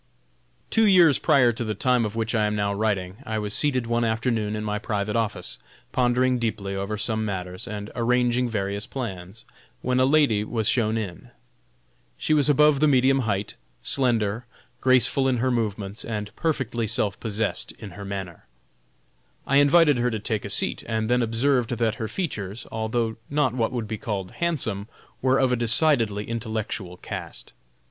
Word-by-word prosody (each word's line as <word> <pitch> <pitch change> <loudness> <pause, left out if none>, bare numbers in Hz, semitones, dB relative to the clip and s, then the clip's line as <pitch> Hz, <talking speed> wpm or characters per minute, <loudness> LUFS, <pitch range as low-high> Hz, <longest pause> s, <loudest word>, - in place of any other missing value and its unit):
Two 225 -1 +4
years 175 -8 +6
prior 125 -4 +4
to 120 +1 -4
the 110 -2 -3
time 125 +2 +2
of 105 0 -5
which 115 0 -1
I 110 -2 +2
am 105 - -1
now 100 -1 0
writing, 100 -3 -1
I 110 -4 -3
was 105 -1 -2
seated 130 -3 +1
one 120 0 0
afternoon 110 -2 0
in 105 - -4
my 105 0 -2
private 105 0 -2
office, 105 -5 -2 0.3
pondering 125 0 +2
deeply 105 -4 -3
over 100 +2 -3
some 110 +1 -1
matters, 90 -3 -4
and 105 0 -6
arranging 125 +1 +1
various 100 -2 -3
plans, 100 -5 -6 0.4
when 125 0 +1
a 130 - +5
lady 140 -7 +3
was 110 -1 -2
shown 115 -3 +1
in. 95 -6 -6 0.9
She 155 - 0
was 150 -1 +3
above 150 0 +5
the 155 - +4
medium 135 -1 +4
height, 105 -5 -2 0.3
slender, 115 -3 0 0.3
graceful 130 +1 +3
in 130 -2 +1
her 130 +2 +1
movements, 105 -3 -2
and 105 -2 -5
perfectly 125 -8 -1
self 110 -2 0
possessed 105 -4 -2
in 105 -3 -10
her 100 +3 -9
manner. 95 -4 -6 1.0
I 140 - +2
invited 145 -1 +5
her 125 +1 +2
to 110 - -2
take 110 0 -2
a - - -5
seat, - - 0
and 110 0 -1
then 125 0 +3
observed 120 +1 +1
that 115 -1 0
her 110 - -1
features, 110 - -4
although 110 0 -2
not 145 -4 +1
what 115 -3 0
would 120 -4 -3
be 110 0 -5
called 100 -4 -4
handsome, 115 -12 -2 0.3
were 130 +1 +3
of 130 -1 +2
a - - +3
decidedly 115 -3 +4
intellectual 110 -5 -4
cast. - - -7
115 Hz, 170 wpm, -24 LUFS, 105-125 Hz, 1.0 s, years